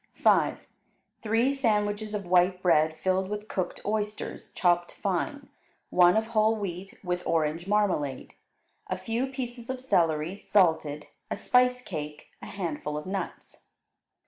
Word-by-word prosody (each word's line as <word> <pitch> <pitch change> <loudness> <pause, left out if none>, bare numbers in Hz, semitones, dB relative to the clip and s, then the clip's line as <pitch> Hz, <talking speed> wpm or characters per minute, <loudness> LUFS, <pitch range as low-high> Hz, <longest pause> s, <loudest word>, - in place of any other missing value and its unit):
5. - - +2 0.6
Three 230 +5 +2
sandwiches 210 -4 0
of 200 -2 -4
white 180 +1 +3
bread 155 -3 +3
filled 190 +2 0
with 210 +1 -5
cooked 185 -4 -3
oysters, 210 0 -3
chopped 175 -1 +2
fine, 270 - -2 0.4
one 180 +2 +6
of 220 - +1
whole 220 0 +4
wheat 195 +2 -6
with 180 -1 -1
orange 165 +2 0
marmalade; 190 -10 0 0.5
a 185 - -2
few 225 +7 -2
pieces 245 -3 -6
of 260 -1 -3
celery, 170 -6 +1
salted, 160 -6 +2 0.2
a - - -1
spice 250 0 +3
cake; 150 -6 -7
a - - -8
handful 155 -5 -4
of 150 - -6
nuts. 190 -1 -6
190 Hz, 135 wpm, -28 LUFS, 175-220 Hz, 0.6 s, one